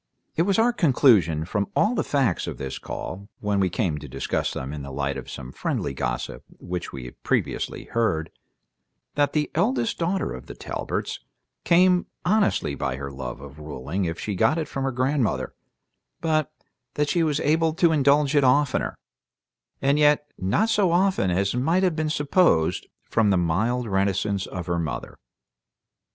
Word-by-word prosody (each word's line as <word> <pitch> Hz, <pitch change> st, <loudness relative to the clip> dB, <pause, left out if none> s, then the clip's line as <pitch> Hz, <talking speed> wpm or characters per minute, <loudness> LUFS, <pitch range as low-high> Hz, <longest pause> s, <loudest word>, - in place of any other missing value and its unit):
It -, -, +2 dB
was 195 Hz, -, +3 dB
our 235 Hz, +2 st, +4 dB
conclusion 115 Hz, -, +4 dB
from 100 Hz, +2 st, -1 dB
all 215 Hz, -, +3 dB
the -, -, 0 dB
facts 130 Hz, -, 0 dB
of -, -, -5 dB
this 65 Hz, -1 st, -5 dB
call, 100 Hz, +2 st, -6 dB
when 105 Hz, -1 st, 0 dB
we 95 Hz, -1 st, +2 dB
came 85 Hz, -4 st, -1 dB
to 75 Hz, -, -9 dB
discuss 70 Hz, +1 st, -2 dB
them 65 Hz, +3 st, -5 dB
in 75 Hz, -, -5 dB
the 70 Hz, -, -7 dB
light 70 Hz, 0 st, -2 dB
of 65 Hz, -, -7 dB
some 65 Hz, -, -7 dB
friendly -, -, -2 dB
gossip 65 Hz, -3 st, -3 dB
which 90 Hz, -1 st, -5 dB
we 65 Hz, -2 st, -7 dB
had -, -, -12 dB
previously -, -, -1 dB
heard, 85 Hz, -9 st, -1 dB, 0.8 s
that 145 Hz, 0 st, +1 dB
the 150 Hz, -1 st, 0 dB
eldest 120 Hz, -3 st, 0 dB
daughter 180 Hz, +3 st, 0 dB
of 65 Hz, -, -9 dB
the -, -, -8 dB
Talberts -, -, -4 dB, 0.4 s
came 180 Hz, +1 st, +4 dB, 0.2 s
honestly 210 Hz, -, +2 dB
by 70 Hz, -2 st, -2 dB
her 70 Hz, +1 st, -6 dB
love 65 Hz, -1 st, -6 dB
of 70 Hz, +1 st, -11 dB
ruling 75 Hz, +5 st, -3 dB
if 80 Hz, 0 st, -3 dB
she 105 Hz, -, -3 dB
got 110 Hz, -, +2 dB
it 160 Hz, -3 st, -2 dB
from 135 Hz, 0 st, -3 dB
her 135 Hz, -, 0 dB
grandmother, 130 Hz, -1 st, 0 dB, 0.7 s
but 155 Hz, -2 st, 0 dB, 0.4 s
that 150 Hz, 0 st, +1 dB
she 175 Hz, -, +2 dB
was 150 Hz, -3 st, +1 dB
able 160 Hz, +2 st, +2 dB
to 170 Hz, 0 st, +3 dB
indulge 145 Hz, -1 st, +3 dB
it 145 Hz, -, +5 dB
oftener, 135 Hz, +1 st, +2 dB, 0.9 s
and 140 Hz, +2 st, +3 dB
yet 150 Hz, 0 st, +3 dB
not 105 Hz, -, +1 dB
so 205 Hz, -5 st, +3 dB
often 185 Hz, -, +2 dB
as 95 Hz, +2 st, +1 dB
might 160 Hz, +10 st, +2 dB
have 180 Hz, -4 st, +2 dB
been 155 Hz, -1 st, -1 dB
supposed 145 Hz, -, +2 dB, 0.2 s
from 110 Hz, -3 st, +2 dB
the 95 Hz, -, +4 dB
mild 110 Hz, +9 st, +1 dB
reticence 100 Hz, -1 st, 0 dB
of 90 Hz, -2 st, -5 dB
her 85 Hz, 0 st, -1 dB
mother. 80 Hz, -3 st, -5 dB
115 Hz, 175 wpm, -25 LUFS, -, 0.9 s, it